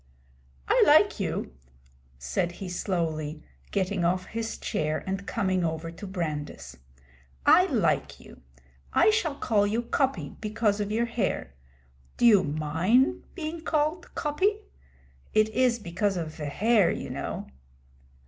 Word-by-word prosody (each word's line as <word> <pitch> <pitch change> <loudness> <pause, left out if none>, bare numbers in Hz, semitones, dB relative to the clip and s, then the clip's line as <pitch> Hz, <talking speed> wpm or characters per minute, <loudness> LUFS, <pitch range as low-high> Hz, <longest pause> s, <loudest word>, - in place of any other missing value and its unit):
'I - - +5
like - - +5
you,' - - -3 0.6
said 65 - -2
he 190 - -7
slowly, 160 -4 -2 0.3
getting 190 -2 -1
off 180 +2 +1
his 225 0 -4
chair 155 0 -2
and 195 +1 -4
coming 190 -4 0
over 160 0 -2
to 190 +4 -9
Brandis. 150 - -5 0.7
'I - - +6
like - - 0
you. - - -15 0.5
I 435 - +5
shall 350 -10 0
call 210 -7 +1
you 225 +3 -1
Coppy, 235 - 0
because 215 -1 0
of 205 0 -3
your 230 +2 +1
hair. 220 - -2 0.6
Do - - +2
you 210 -5 +7
mind 160 - +1
being 325 -1 -5
called 310 +2 -1
Coppy? 385 +8 0 0.7
It 215 0 +4
is 245 +1 +2
because 195 0 -1
of 165 -2 -3
ve 150 - -6
hair, 205 +6 +3
you - - -4
know.' - - -4
200 Hz, 135 wpm, -27 LUFS, 165-235 Hz, 0.7 s, you